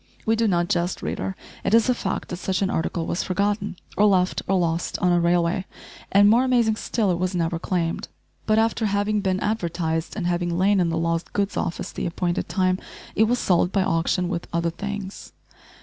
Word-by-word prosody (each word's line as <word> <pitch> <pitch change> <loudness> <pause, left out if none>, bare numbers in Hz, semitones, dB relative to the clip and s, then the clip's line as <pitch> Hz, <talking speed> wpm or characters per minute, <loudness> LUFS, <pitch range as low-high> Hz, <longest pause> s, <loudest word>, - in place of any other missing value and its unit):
We 225 - +3
do 225 0 +2
not 175 -3 +1
jest, 175 +1 -1
reader. 190 - -3 0.3
It 220 - +3
is 230 - +4
a 250 - +4
fact 195 -5 -3
that 175 - -4
such 185 +1 -1
an 195 - 0
article 165 +1 -1
was 170 - -1
forgotten, 205 +2 -1 0.2
or 205 - +4
left 185 -3 +2
or 195 - +2
lost, 170 -1 -1
on 180 - +2
a 175 - +4
railway, 175 +2 +1 0.5
and, 200 +1 +6
more 230 +4 +5
amazing 235 -4 +2
still, 215 -5 0
it 175 - -1
was 185 0 -1
never 165 -1 0
claimed, 170 -2 -2 0.4
but 215 0 +3
after 225 0 +2
having 205 +1 0
been 190 -1 0
advertised, 170 -5 -1
and 195 -5 -3
having 175 -1 0
lain 195 +2 +3
in 175 -2 +2
the 165 - -1
lost 165 0 -1
goods 200 -1 -1
office 165 - -3
the - - -3
appointed 175 +1 -2
time, 185 -1 +1 0.3
it 220 - +4
was 245 +3 +1
sold 180 -4 +2
by 195 -1 +2
auction 175 +1 +1
with 175 -1 -3
other 170 0 0
things. 200 +2 -6
185 Hz, 205 wpm, -24 LUFS, 175-205 Hz, 0.5 s, and